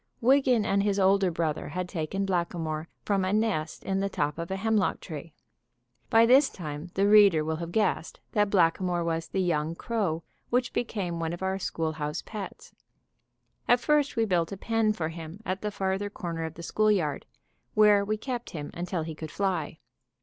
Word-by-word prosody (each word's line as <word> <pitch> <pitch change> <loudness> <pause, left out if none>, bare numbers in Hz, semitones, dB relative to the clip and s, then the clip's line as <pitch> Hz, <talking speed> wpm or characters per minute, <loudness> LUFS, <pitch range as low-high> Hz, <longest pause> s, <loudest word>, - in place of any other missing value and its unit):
Wiggan 255 -3 +4
and 200 -2 +2
his 200 0 +1
older 195 0 +4
brother 165 -3 -2
had 180 +4 -3
taken 180 +3 -2
Blackamoor 170 -4 -2 0.2
from 200 -2 +1
a 185 - 0
nest 205 -8 0
in 195 0 -1
the 200 0 0
top 150 -4 -2
of 170 - -4
a 190 - -1
hemlock 215 0 +1
tree. 160 0 -8 0.8
By 225 -1 +6
this 265 +4 +6
time 155 -1 -7
the 195 +1 +3
reader 200 -7 +6
will 160 0 -1
have 170 +1 -5
guessed 205 -4 0
that 210 -1 +2
Blackamoor 175 -1 +2
was 165 -1 -2
the 190 - -2
young 165 -2 0
crow 185 -7 -2 0.3
which 250 +1 +1
became 190 -8 -2
one 165 0 -2
of 175 - -6
our 190 0 -1
schoolhouse 155 -4 -3
pets. 210 -3 -8 0.9
At 245 - +5
first 290 +1 +2
we 225 -2 +2
built 175 -5 +1
a 195 - -5
pen 225 +1 +1
for 165 -6 -2
him 165 +2 -8
at 185 +1 -2
the 210 - -1
farther 195 0 -2
corner 170 -5 -4
of 160 0 -7
the 170 - -9
schoolyard, 200 -7 +1 0.5
where 210 -2 +6
we 215 +2 -1
kept 245 +1 -4
him 150 -3 -6
until 175 -1 -3
he 160 0 -5
could 155 0 -7
fly. 185 -4 -2
190 Hz, 185 wpm, -28 LUFS, 165-210 Hz, 0.9 s, By